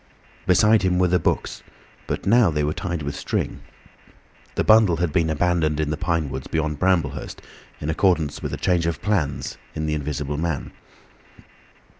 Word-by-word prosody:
Beside 105 +4 +5
him 90 -2 +1
were 90 0 +3
the 90 +1 +3
books, - - -1 0.5
but - - -3
now 115 -1 +5
they 75 -2 0
were 75 +1 0
tied 85 -4 -4
with 70 0 -4
string. - - -3 0.9
The - - +1
bundle 110 -6 +5
had 85 -3 -1
been 80 -1 +2
abandoned 80 -1 +1
in 75 -1 0
the - - 0
pine 80 -2 -1
woods 65 0 -5
beyond 80 -2 -2
Bramblehurst, 85 -7 0 0.4
in 75 - -5
accordance 80 -4 +1
with - - -4
a - - -3
change 85 -2 +1
in 85 - +1
the - - -13
plans 90 -9 -2 0.2
of 80 - -2
the 75 - -1
Invisible 75 -1 -3
Man. 80 -4 -2
80 Hz, 175 wpm, -23 LUFS, 75-90 Hz, 0.9 s, Beside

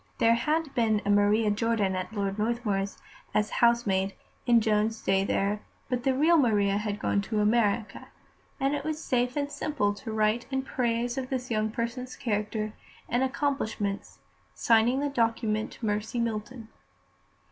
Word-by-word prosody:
There 230 0 +4
had 300 +5 0
been 220 -3 +2
a 205 - +2
Maria 205 +1 +3
Jordan 210 -3 +1
at 185 0 -4
Lord 200 -1 -2
Northmuir's, 210 -3 -1 0.4
as 210 0 +1
housemaid, 200 -5 +2 0.3
in 240 -1 +6
Joan's 220 0 +1
day 195 0 +2
there, 200 +1 0 0.3
but 250 -2 -1
the 265 -1 +3
real 320 +5 +4
Maria 205 -7 +3
had 210 -1 -3
gone 200 - +1
to 210 +2 -2
America, 215 0 +1 0.5
and 275 +1 +1
it 290 -1 -2
was 310 0 -3
safe 250 -3 0
and 285 0 -1
simple 280 -7 -1
to 220 +3 -7
write 215 +2 +1
in 265 -1 -1
praise 240 -1 -1
of 255 -1 -5
this 255 -2 -3
young 215 -1 +1
person's 235 +3 -4
character 215 -3 -2 0.3
and 245 - 0
accomplishments, 260 -7 -2 0.4
signing 235 +4 +3
the 290 - 0
document 225 -4 0
Mercy 215 +2 -1
Milton. 230 0 -3
225 Hz, 155 wpm, -28 LUFS, 210-250 Hz, 0.5 s, in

